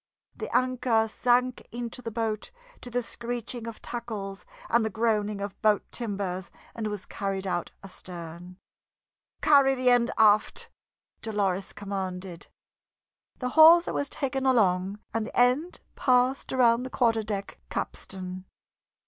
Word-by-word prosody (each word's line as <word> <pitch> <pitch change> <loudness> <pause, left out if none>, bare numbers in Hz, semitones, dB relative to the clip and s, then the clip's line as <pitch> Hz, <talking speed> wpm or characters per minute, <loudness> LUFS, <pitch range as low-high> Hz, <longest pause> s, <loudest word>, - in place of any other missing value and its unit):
The - - -5
anchor 250 -3 +1
sank 250 +2 +1
into 240 +1 -5
the 230 - -4
boat 220 -1 -2 0.3
to 245 - -6
the 245 0 -1
screeching 235 0 -5
of 230 - -8
tackles 215 -5 -6 0.2
and 235 0 +3
the 220 - 0
groaning 215 -1 0
of 200 -1 -6
boat 215 -2 +3
timbers, 195 -5 -3 0.2
and 225 -2 -3
was 210 -2 -5
carried 195 -1 -3
out 180 -2 -2
astern. 180 -1 -9 0.9
"Carry 275 -2 +6
the 255 -1 +3
end 245 -1 +4
aft!" 215 -1 +3 0.5
Dolores 200 -3 -1
commanded; 190 -3 -5 0.9
the 250 - -2
hawser 325 +4 +7
was 285 - -1
taken 270 -1 -2
along 195 -5 +2 0.2
and 225 -1 -1
the - - -3
end 255 +8 +2
passed 255 0 +2
around 240 -2 +4
the 260 - -5
quarter 230 -3 +2
deck 205 -2 -5
capstan. 185 -1 -5
225 Hz, 130 wpm, -27 LUFS, 195-245 Hz, 0.9 s, hawser